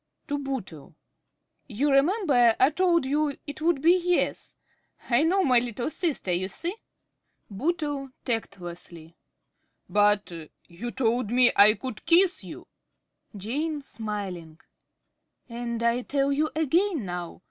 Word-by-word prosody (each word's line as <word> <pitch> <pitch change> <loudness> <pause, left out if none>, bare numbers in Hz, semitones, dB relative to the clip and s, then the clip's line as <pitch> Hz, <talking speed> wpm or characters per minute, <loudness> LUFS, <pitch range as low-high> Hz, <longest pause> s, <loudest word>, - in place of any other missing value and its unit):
(To 290 0 -1
Bootle.) 185 - -6 0.7
You 275 +5 0
remember 275 - +3
I 260 +3 +5
told 340 -2 +2
you 290 +1 0
it 290 +1 -8
would 320 -3 +1
be 340 +2 +6
"Yes." 355 0 -1 0.6
I 240 +3 +4
know 370 +5 +2
my 255 -5 +4
little 240 +4 -4
sister, 315 - -2
you 180 +2 0
see. 340 - -4 0.8
~Bootle~ 290 - -2 0.2
(tactlessly). 175 -7 -6 0.7
But 205 -1 +2 0.4
you 185 +8 -7
told 240 -2 0
me 245 +1 +5
I 210 +2 +7
could 255 -3 -7
kiss 355 +2 +4
you! - - -10 0.7
~Jane~ 290 - -3
(smiling). 195 -9 -6 0.9
And 235 -1 -4
I 235 +1 +2
tell 275 +2 0
you 305 +2 +1
again 320 - +1
now. 175 -1 -6
255 Hz, 125 wpm, -26 LUFS, 210-310 Hz, 0.9 s, I